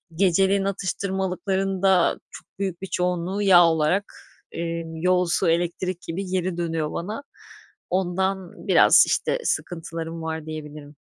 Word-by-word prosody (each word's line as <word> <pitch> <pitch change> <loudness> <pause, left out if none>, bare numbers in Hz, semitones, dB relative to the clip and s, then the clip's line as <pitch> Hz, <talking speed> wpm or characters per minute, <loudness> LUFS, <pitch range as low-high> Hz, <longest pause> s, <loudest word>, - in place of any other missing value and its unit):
geceleyin 195 +2 +3
atıştırmalıkların 190 0 -2
da 190 -3 +3
çok - - -12
büyük 190 -2 -3
bir 190 - -5
çoğunluğu 180 +3 -1
yağ 180 -3 +7
olarak, 165 +5 +1 0.4
eee, 165 0 -3
yol, 180 +2 +2
su, 170 0 +1
elektrik 175 +1 -1
gibi 185 +4 -5
geri 185 -1 -2
dönüyor 165 -3 -2
bana. 215 +10 -5 0.7
Ondan 190 0 -2
biraz, - - +7
işte, - - 0
sıkıntılarım 165 -1 -3
var 160 -1 -4
diyebilirim. 150 -1 -8
180 Hz, 125 wpm, -24 LUFS, 165-190 Hz, 0.7 s, yağ